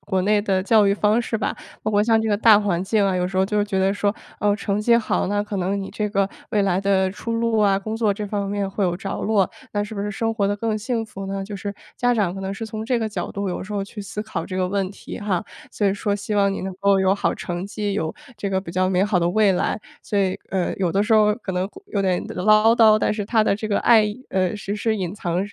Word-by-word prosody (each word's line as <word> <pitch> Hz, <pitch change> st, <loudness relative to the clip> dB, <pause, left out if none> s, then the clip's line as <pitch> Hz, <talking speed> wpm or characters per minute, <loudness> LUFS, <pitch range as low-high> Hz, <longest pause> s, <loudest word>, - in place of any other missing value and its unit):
国 190 Hz, -2 st, -1 dB
内 205 Hz, +1 st, +3 dB
的 190 Hz, -3 st, +1 dB
教 210 Hz, 0 st, +4 dB
育 200 Hz, -, +4 dB
方 210 Hz, +3 st, +2 dB
式 230 Hz, -1 st, -2 dB
吧， 210 Hz, -, -2 dB, 0.3 s
包 215 Hz, -, -1 dB
括 205 Hz, 0 st, +3 dB
像 225 Hz, 0 st, +3 dB
这 220 Hz, -, -1 dB
个 205 Hz, -, +2 dB
大 215 Hz, -1 st, +6 dB
环 185 Hz, -4 st, 0 dB
境 210 Hz, 0 st, +2 dB
啊， 190 Hz, -, +1 dB
有 180 Hz, -, 0 dB
时 185 Hz, +1 st, -5 dB
候 190 Hz, -, +4 dB
就 210 Hz, 0 st, +1 dB
觉 200 Hz, -2 st, -2 dB
得 190 Hz, +1 st, +2 dB
说， 205 Hz, 0 st, 0 dB, 0.3 s
哦， 205 Hz, -1 st, +3 dB
成 205 Hz, -1 st, -1 dB
绩 235 Hz, +2 st, +4 dB
好， 230 Hz, -, 0 dB
那 205 Hz, 0 st, 0 dB
可 205 Hz, -1 st, -5 dB
能 190 Hz, +2 st, -1 dB
你 195 Hz, -, -6 dB
这 210 Hz, +1 st, -2 dB
个 195 Hz, -1 st, +1 dB, 0.2 s
未 205 Hz, -2 st, +2 dB
来 190 Hz, -1 st, +1 dB
的 190 Hz, -1 st, +2 dB
出 230 Hz, +3 st, -5 dB
路 230 Hz, -1 st, +1 dB
啊， 200 Hz, -2 st, +3 dB
工 215 Hz, +2 st, -5 dB
作 220 Hz, -3 st, +2 dB
这 210 Hz, +1 st, -4 dB
方 200 Hz, -1 st, -2 dB
面 200 Hz, -1 st, -2 dB
会 200 Hz, -, -3 dB
有 175 Hz, -1 st, 0 dB
着 195 Hz, +1 st, -5 dB
落， 205 Hz, -3 st, +2 dB, 0.2 s
那 205 Hz, -, 0 dB
是 220 Hz, -, -8 dB
不 200 Hz, -, -4 dB
是 205 Hz, +1 st, -2 dB
生 225 Hz, +3 st, -1 dB
活 205 Hz, -3 st, 0 dB
得 205 Hz, -, 0 dB
更 220 Hz, 0 st, -1 dB
幸 225 Hz, +1 st, -2 dB
福 195 Hz, -2 st, -8 dB
呢？ 195 Hz, 0 st, -3 dB
就 205 Hz, +1 st, -7 dB
是 200 Hz, +1 st, -5 dB, 0.2 s
家 245 Hz, 0 st, +2 dB
长 195 Hz, -5 st, 0 dB
可 195 Hz, -, -6 dB
能 195 Hz, 0 st, -3 dB
是 225 Hz, -, -5 dB
从 220 Hz, 0 st, -5 dB
这 245 Hz, 0 st, +1 dB
个 220 Hz, -, -1 dB
角 -, -, -4 dB
度 200 Hz, -1 st, -3 dB
有 -, -, -4 dB
时 210 Hz, +3 st, -8 dB
候 200 Hz, -1 st, -1 dB
去 210 Hz, -, -9 dB
思 210 Hz, +1 st, -5 dB
考 220 Hz, -, -4 dB
这 185 Hz, -, -5 dB
个 185 Hz, -1 st, 0 dB
问 195 Hz, -1 st, -1 dB
题 -, -, -9 dB
哈。 200 Hz, -4 st, -1 dB, 0.3 s
所 205 Hz, -, 0 dB
以 195 Hz, -, +3 dB
说 205 Hz, 0 st, -1 dB
希 205 Hz, +1 st, -4 dB
望 200 Hz, -1 st, +3 dB
你 -, -, -4 dB
能 190 Hz, 0 st, -4 dB
够 200 Hz, -1 st, +4 dB
有 190 Hz, 0 st, +3 dB
好 200 Hz, -, 0 dB
成 175 Hz, 0 st, -4 dB
绩， 205 Hz, 0 st, -3 dB
有 160 Hz, -6 st, -2 dB, 0.2 s
这 200 Hz, -1 st, -2 dB
个 190 Hz, -, 0 dB
比 180 Hz, -3 st, -7 dB
较 185 Hz, 0 st, +1 dB
美 190 Hz, +1 st, +2 dB
好 205 Hz, -3 st, +1 dB
的 170 Hz, 0 st, +1 dB
未 205 Hz, +1 st, +3 dB
来。 180 Hz, -, 0 dB, 0.2 s
所 205 Hz, -, -1 dB
以， 190 Hz, -1 st, +1 dB
呃， 185 Hz, -2 st, -1 dB
有 180 Hz, -3 st, 0 dB
的 195 Hz, +3 st, +2 dB
时 220 Hz, +2 st, 0 dB
候， 210 Hz, -1 st, +5 dB
可 210 Hz, -5 st, -6 dB
能 180 Hz, +2 st, -1 dB
会， 385 Hz, -, -15 dB
有 205 Hz, -, -1 dB
点 185 Hz, -2 st, 0 dB
唠 215 Hz, +4 st, +4 dB
叨， 220 Hz, -2 st, +6 dB
但 -, -, +1 dB
是 210 Hz, -1 st, -3 dB
她 220 Hz, -1 st, +3 dB
的 200 Hz, -, +2 dB
这 215 Hz, +1 st, -4 dB
个 205 Hz, -, +1 dB
爱， 220 Hz, -3 st, +5 dB, 0.2 s
呃， 190 Hz, +1 st, 0 dB
实 205 Hz, 0 st, -4 dB
施 220 Hz, +1 st, 0 dB
隐 185 Hz, -1 st, -3 dB
藏 175 Hz, -4 st, -2 dB
205 Hz, 310 characters per minute, -22 LUFS, 195-215 Hz, 0.3 s, 大